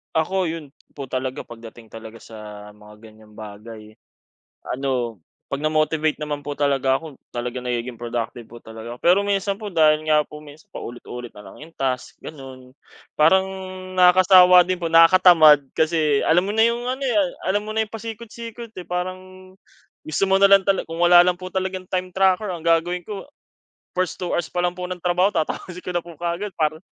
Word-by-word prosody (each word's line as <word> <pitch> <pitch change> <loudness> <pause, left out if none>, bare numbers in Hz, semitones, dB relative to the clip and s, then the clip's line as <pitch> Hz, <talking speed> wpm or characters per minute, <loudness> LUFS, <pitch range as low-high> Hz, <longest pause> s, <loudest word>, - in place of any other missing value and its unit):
Ako, 185 +4 +1
yun 155 -3 -8 0.2
po 140 - -5
talaga 130 +1 -4
'pag 120 -1 -12
dating 115 -1 -16
talaga 110 +1 -11
sa 115 - -15 0.4
mga 105 0 -16
ganyang 110 -1 -17
bagay. 105 +1 -11 0.8
Ano 125 -4 -2 0.3
'pag 140 - -4
na 155 - +1
motivate 155 0 0
naman 145 -1 -4
po 145 - -4
talaga 135 -2 +1
ako, 160 -4 -11 0.2
talagang 125 +1 -5
nagiging 120 0 -3
productive 120 0 -5
po 120 +1 -14
talaga. 115 +2 -10
Pero 185 +4 +3
minsan 200 0 -1
po, 210 -1 -8
dahil 155 -2 +3
nga 155 -1 +3
po 150 0 -11
mins 150 +1 -15
paulit-ulit 120 0 -9
na - - -13
lang - - -12
yung 165 - -17
task, 130 -4 -4
ganon. 130 -3 -11 0.4
Parang 190 +5 +4 0.5
nakakasawa 180 0 +7
din 185 - 0
po, 170 -2 -4
nakakatamad. 165 -3 +7
Kasi 155 -3 +1
alam 175 +3 +4
mo 200 - -3
na 220 +1 +4
yung 235 +1 -3
ano 260 - -7
ya 240 -7 +2 0.3
alam 205 +2 0
mo 215 - -5
na 220 - 0
yung 220 -1 -3
pasikot-sikot, 230 +1 -9
eh. 180 - -7
Parang 185 +1 -6 0.5
gusto 155 - -3
mo 195 - +4
na 195 - +4
lang 195 - +8
talag 195 -1 +2
kung 165 +1 -7
wala 175 0 +7
lang 180 0 0
po 185 - -6
talagang 185 -1 -4
time 185 -1 -3
tracker 190 +1 +1
ang 170 - -6
gagawin 170 +2 +1
ko, 195 +2 -8 0.7
first 185 -4 -2
2 175 -2 -3
pa 175 0 -2
lang 175 - +1
po 180 0 -6
ng 180 -1 -6
trabaho 180 +2 +3
tatapusin 180 0 -4
ko 180 - -4
na 175 - 0
po 170 -1 -13
kaagad. 175 +5 -3
Para 155 0 -1
165 Hz, 185 wpm, -22 LUFS, 135-185 Hz, 0.8 s, lang